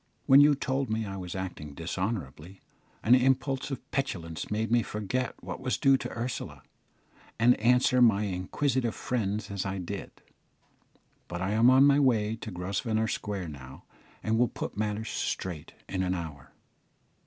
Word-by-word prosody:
When 135 +2 +8
you 145 0 +6
told 135 -1 -1
me 110 0 -1
I 100 -1 -5
was 90 -1 -6
acting 85 -6 -6
dishonourably, 90 - -4 0.4
an 115 - +5
impulse 130 +2 +2
of 135 - -7
petulance 85 - -3
made 110 +2 -1
me 120 0 +4
forget 110 +4 -3
what - - -6
was - - -1
due 135 0 +5
to - - -5
Ursula, 120 +1 -4 0.7
and 120 +2 +6
answer 125 +2 +4
my 110 -4 +5
inquisitive 115 +6 -1
friends 105 -4 -2
as 100 -2 -2
I 95 0 -3
did; 95 +2 -5 1.2
but 90 - -5
I 95 +2 -1
am 115 +3 +5
on 130 +2 +7
my 140 0 +5
way 110 -6 +2
to 110 - -7
Grosvenor 100 +4 -1
Square 100 -5 -3
now, 65 -3 -11 0.4
and 110 +1 +1
will 125 - +4
put - - -6
matters 105 +1 -2
straight 85 -5 -4
in 95 - -2
an 90 0 0
hour." 75 -6 -7
105 Hz, 160 wpm, -29 LUFS, 95-125 Hz, 1.2 s, When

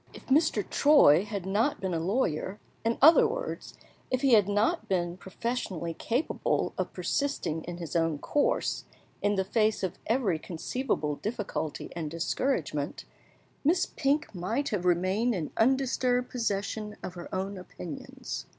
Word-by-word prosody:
If - - -13
Mr. 270 - +3
Troy 210 - +6
had 205 -3 -4
not 215 +9 +1
been 190 -2 -2
a 165 - 0
lawyer 185 0 -1 0.2
in 230 0 +1
other 340 - +8
words, - - -5 0.3
if 255 0 0
he 270 -3 +4
had 205 -3 +6
not 220 +12 +1
been 175 -2 0
professionally 185 -3 -3
capable 240 - -1
of - - -2
persisting 280 - -1
in 175 0 -6
his 170 -1 -6
own 165 -2 +2
course, 285 - 0 0.4
in 205 0 +2
the 190 -1 0
face 215 0 +1
of 190 0 -3
every 215 -8 +1
conceivable 160 - -2
difficulty 205 -8 -4
and 160 -3 -3
discouragement 165 - -1 0.6
Miss 345 +5 +3
Pink 285 -2 0
might 220 +10 -1
have 190 -4 -2
remained 185 +7 +2
in 165 -5 -3
undisturbed 250 0 +2
possession 210 -2 -2
of 180 - -5
her 175 -1 -8
own 190 +2 -2
opinions. 160 - -7
205 Hz, 145 wpm, -29 LUFS, 175-255 Hz, 0.6 s, other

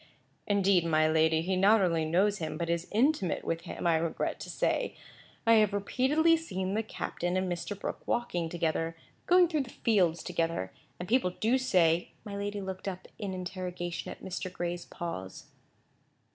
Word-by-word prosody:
"Indeed, 195 -3 +3
my 155 -1 +3
lady, 160 0 +3
he 185 +2 0
not 200 +4 +5
only 165 -4 +2
knows 195 +6 +2
him, 160 - -3
but 170 -1 -1
is 170 +1 -1
intimate 225 - +2
with 165 0 -2
him, - - -6
I 170 -1 +4
regret 165 0 -2
to - - -7
say. - - -1 0.5
I 230 - +6
have 210 -2 +3
repeatedly 270 +11 +3
seen 190 - -3
the 220 - +1
captain 180 -4 -3
and 185 0 0
Mr. 175 +3 -4
Brooke - - -5
walking 175 -9 -1
together; 165 -1 -1 0.3
going 360 0 +6
through 315 -3 0
the 260 - -6
fields 185 -9 +1
together; 165 - -1 0.3
and 180 - -5
people 240 -4 +3
do 225 +8 +1
say—" 175 -9 +2
My 205 -1 -6
lady 205 0 -3
looked 190 0 -6
up 185 -1 -5
in 195 -3 -3
interrogation 180 -1 -4
at - - -9
Mr. 185 0 -4
Gray's 175 0 -4
pause. 95 - -7
185 Hz, 175 wpm, -30 LUFS, 170-205 Hz, 0.5 s, I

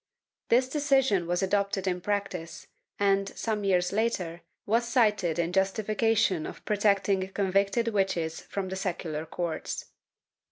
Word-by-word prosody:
This 250 +2 +4
decision 270 - +2
was 175 +2 0
adopted 200 0 0
in 180 -1 -1
practice 190 -4 -3 0.3
and, 195 -1 +2
some 215 -2 -2
years 180 -2 +2
later, 190 -6 -1 0.2
was 230 +3 +1
cited 210 - +2
in 170 +1 -1
justi 195 +3 +1
fication 215 -6 +1
of - - -12
protecting 200 -2 +2
convicted 200 +4 +1
witches 190 -6 0
from 195 -2 -4
the 190 - -4
secular 170 -5 -3
courts. 170 -1 -4
195 Hz, 130 wpm, -28 LUFS, 180-215 Hz, 0.3 s, This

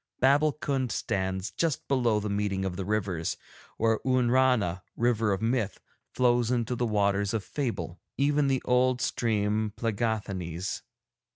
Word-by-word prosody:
Babbulkund 140 -2 +2
stands 95 +1 -2
just 165 -5 -1
below 120 -6 +2
the 105 - -3
meeting 100 -2 -1
of 95 -2 -3
the 95 0 -4
rivers, 95 -5 -1 0.4
where 115 -1 +2
Oonrana, 125 -7 +2 0.2
River 115 -3 +2
of 100 +2 -1
Myth, 115 -4 0 0.4
flows 120 -2 +3
into 125 -1 0
the 120 0 0
Waters 100 -1 +1
of 110 - -1
Fable, 95 - -3 0.2
even 145 +1 +2
the 135 -2 +1
old 125 0 +3
stream 110 -3 0
Plegáthanees. 100 -6 -2
110 Hz, 130 wpm, -28 LUFS, 100-125 Hz, 0.4 s, flows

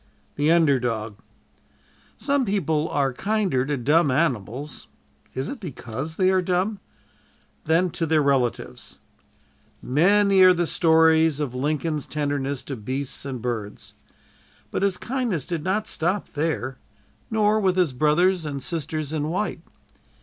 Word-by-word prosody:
"THE 145 +2 +1
UNDER 160 -6 +4
DOG" 110 -4 -3 1.0
Some 280 +3 +1
people 160 - 0
are 140 -2 0
kinder 195 -6 0
to 145 -1 -1
dumb 150 +5 +3
animals 130 - -2 0.5
is 130 +1 -2
it 280 - -6
because 145 - -6
they 185 +1 +3
are 190 -1 +3
dumb? 185 +4 -1 0.9
than 165 +3 +2
to 165 - -2
their 155 -1 +3
relatives. 125 - -1 0.8
Many 195 +7 +3
are 185 -1 +8
the 175 0 +1
stories 160 -2 +4
of 145 -5 -2
Lincoln's 150 +3 -2
tenderness 145 -2 -2
to 135 - -5
beasts 130 +5 -4
and 130 -4 -5
birds. 110 -4 -5 0.8
But - - -2
his 195 -2 +1
kindness 235 - -2
did 170 -4 -3
not 200 +4 -1
stop 180 +5 -1
there, 145 -5 -2 0.5
nor 215 0 +2
with 190 -3 +1
his 175 -7 +2
brothers 160 +6 +2
and 140 -3 -5
sisters 155 -2 -3
in 150 -1 -1
white. 185 +5 -2
155 Hz, 135 wpm, -24 LUFS, 135-185 Hz, 1.0 s, are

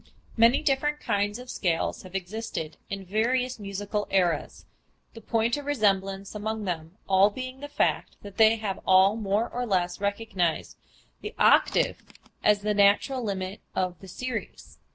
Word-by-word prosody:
Many 230 +5 +4
different 295 +1 +1
kinds 205 +1 -1
of 250 0 -8
scales 170 -4 -1
have 185 0 -12
existed 190 -4 -4
in 195 -1 -5
various 245 +5 0
musical 205 +1 -3
eras, 180 -4 0 0.5
the 225 - -11
point 230 +3 0
of 290 - -7
resemblance 195 -7 0
among 215 +1 -3
them 165 -1 -4
all 195 +1 +5
being 255 +4 -7
the 290 - -6
fact 290 - 0
that 200 -1 -11
they 220 0 +6
have 210 -4 -4
all 190 +2 +6
more 215 +1 0
or 245 - -4
less 185 -4 -1
recognized 200 -5 -1 0.5
the - - -7
octave - - +3 0.4
as 210 -1 +4
the 210 0 +1
natural 205 +6 +3
limit 195 -2 -4
of 185 -1 -1
the 190 - -12
series. 230 +5 -6
205 Hz, 155 wpm, -27 LUFS, 190-230 Hz, 0.5 s, they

